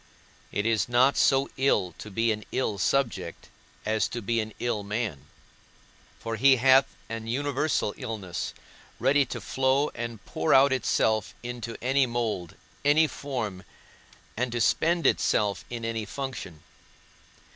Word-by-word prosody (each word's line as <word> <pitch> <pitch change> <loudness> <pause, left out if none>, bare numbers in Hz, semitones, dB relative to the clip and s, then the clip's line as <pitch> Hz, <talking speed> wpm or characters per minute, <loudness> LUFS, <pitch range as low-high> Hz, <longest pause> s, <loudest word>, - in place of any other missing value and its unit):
It 100 - -1
is 115 0 +1
not 125 +3 +4
so 135 0 +3
ill 130 -10 +2
to 110 - -8
be 115 +3 +1
an 105 0 -3
ill 110 -6 -1
subject 135 +3 -1 0.4
as 110 0 +1
to 120 - -5
be 115 +1 0
an 110 0 -3
ill 120 -4 -1
man; 100 - -4 0.9
for 115 -1 -4
he 135 +4 +6
hath 130 +2 +4
an 115 0 -6
universal 140 -2 0
illness, 95 -6 -5 0.4
ready 140 +1 +3
to - - -5
flow 135 +2 +1
and 115 -3 -6
pour 80 - +1
out 135 +1 +6
itself 110 -5 +1
into 120 -1 -5
any 135 +1 +3
mould, 115 -8 -2 0.3
any 150 +3 +5
form, 120 -11 -4 0.7
and 125 +1 -1
to 120 - -1
spend 170 +9 +2
itself 100 -3 +2
in 120 -1 -5
any 115 -1 -2
function. 110 - -6
115 Hz, 140 wpm, -27 LUFS, 110-135 Hz, 0.9 s, he